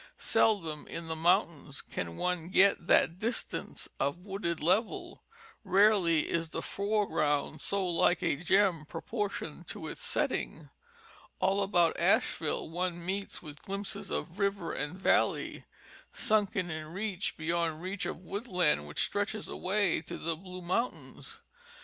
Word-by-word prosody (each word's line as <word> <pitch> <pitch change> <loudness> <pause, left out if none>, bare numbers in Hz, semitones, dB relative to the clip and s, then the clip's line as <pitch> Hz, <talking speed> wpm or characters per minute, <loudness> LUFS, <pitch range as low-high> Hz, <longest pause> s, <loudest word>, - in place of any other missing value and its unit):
Seldom 165 -9 +1
in 165 - -6
the 160 0 -3
mountains 160 -3 +1
can 85 -1 -5
one 180 -2 -1
get 190 -2 +4
that 170 +2 +4
distance 230 +4 -3
of 140 +4 0
wooded 190 -4 -2
level, 190 +7 0 0.4
rarely 190 -6 +4
is 165 -1 -1
the - - -4
fore 205 +1 0
ground 145 0 0
so 200 -1 +1
like 175 +1 +2
a 165 - +2
gem 175 +1 +3
proportioned 205 +5 -4
to - - -5
its - - -6
setting; - - -1 0.7
all 195 +1 +2
about 175 -4 +3
Ashe - - +3
ville - - -2
one 175 +1 -3
meets 195 +1 -3
with 150 -2 -9
glimpses 200 +1 -4
of 180 +4 -4
river 200 -4 0
and 150 +5 -3
valley, - - +1 0.5
sunken 205 -5 +1
in 155 -1 -5
reach 195 +2 -3
beyond 165 0 -1
reach 190 +1 -2
of - - -4
woodland 180 - 0
which 75 - +1
stretch 205 +1 -1
away 200 -3 0
to 160 - -7
the 165 0 -2
blue 180 +2 -9
mountains. 230 +8 -3
180 Hz, 140 wpm, -31 LUFS, 165-200 Hz, 0.7 s, get